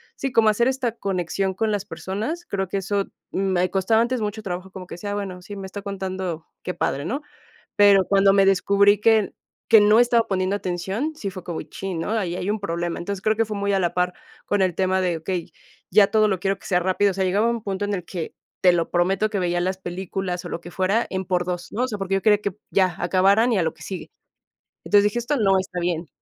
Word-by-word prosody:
sí, 270 - -3
como 225 -2 +4
hacer 235 +3 +2
esta 260 -3 0
conexión 190 0 -1
con 220 +2 0
las 205 -1 -2
personas, 220 - -4
creo 195 -1 -2
que 190 - -2
eso 195 +1 -1 0.3
me 185 -2 +1
costaba 200 +4 +2
antes 245 +1 0
mucho 210 +1 -3
trabajo, 185 -1 -5
como 185 -2 -9
que - - -7
decía, 205 +4 -5
bueno, 195 -3 -4
sí, 205 +1 -8
me 195 -1 -6
está 200 +1 -8
contando, 185 -4 -4 0.2
qué 180 - -3
padre, 140 -3 -2
¿no? 270 - -2 0.5
Pero 200 -2 +6
cuando 195 0 +4
me 195 -1 +5
descubrí 200 +1 +4
que 220 -2 +3 0.4
que 225 -2 +9
no 210 +2 +6
estaba 240 -1 +3
poniendo 190 0 0
atención, 195 - -3
sí 200 -9 -5
fue 185 -2 -9
como, 170 -3 -4
chin, 180 +3 -6
¿no? 185 - -3
Ahí 190 -6 -1
hay 180 +2 -3
un 215 - -2
problema. 170 -3 -3
Entonces, 195 +2 -5
creo 215 0 +2
que 225 +1 +1
fue 210 -1 -5
muy 200 0 0
a 195 - +2
la 175 -2 -1
par 180 0 +1 0.3
con 205 -1 +1
el 185 -3 +1
tema 190 0 +1
de, 175 -2 0
okey, 175 +1 -4 0.4
ya 200 +2 +6
todo 215 -1 +4
lo 190 -3 0
quiero 195 +1 -1
que - - -11
sea 180 -2 +2
rápido, 190 +3 +2
o - - -5
sea, 195 - 0
llegaba 205 +5 +2
un 235 -2 -2
punto 200 0 -2
en 205 - -2
el 180 - -5
que 165 -1 -6 0.3
te 180 - +6
lo 170 -1 -1
prometo 190 +4 +2
que 205 - -1
veía 175 -1 0
las 185 +1 -1
películas 185 0 -4
o - - -5
lo 170 - -5
que 175 - -10
fuera 190 +6 0
en 190 0 -3
por 180 -1 0
dos, 175 0 -4
¿no? 240 - -1
O - - +1
sea, 215 -5 -4
porque 195 -1 -3
yo 195 - 0
quería 210 -1 +4
que 200 -2 -2 0.2
ya 185 -2 +2
acabaran 195 +6 +3
y - - +2
a 180 - +2
lo 160 - -1
que - - -21
sigue. 190 -2 -7 0.7
Entonces, 205 -1 +5
dije: 210 +3 +1
"Esto 240 +5 -1
no 195 -6 +3
está 185 -1 -4
bien—". 170 -1 -2
195 Hz, 245 wpm, -23 LUFS, 180-205 Hz, 0.7 s, que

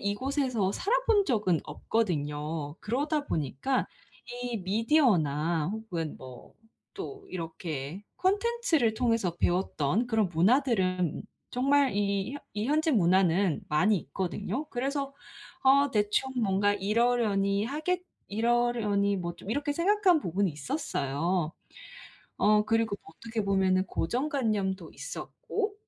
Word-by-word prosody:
이 200 0 0
곳에서 255 -5 0
살아 430 - +1
본 415 -3 +5
적은 210 - +1
없거든요. 150 -4 -2
그러다 285 +6 -1
보니까 150 - -1 0.6
이 240 -2 -2
미디어나 180 - +2
혹은 180 -8 -4
뭐 130 -2 -12 0.4
또 405 -1 -8
이렇게 165 -1 -5
콘텐츠를 395 - +1
통해서 230 -7 0
배웠던 180 - 0
그런 220 -5 +2
문화들은 185 - +2 0.3
정말 275 +1 +3
이 200 +3 0 0.2
이 210 +1 -1
현재 310 +3 +2
문화는 185 - +3
많이 190 +8 +3
있거든요. 195 - -4
그래서 275 +2 -2 0.5
어 280 +1 +5
대충 210 +5 +1
뭔가 205 0 +2
이러려니 205 -1 +1
하겠 315 +7 -1 0.2
이러려니 220 -3 +1
뭐 170 -2 -4
좀 - - -12
이렇게 290 +5 -1
생각한 370 +2 +3
부분이 190 - 0
있었어요. 155 - -2 0.9
어 210 0 +4
그리고 225 -1 +1
어떻게 220 +6 -5
보면은 190 -1 +2
고정 245 - -1
관념도 200 - -1
있었고. 425 -1 -4
210 Hz, 260 characters per minute, -29 LUFS, 180-265 Hz, 0.9 s, 본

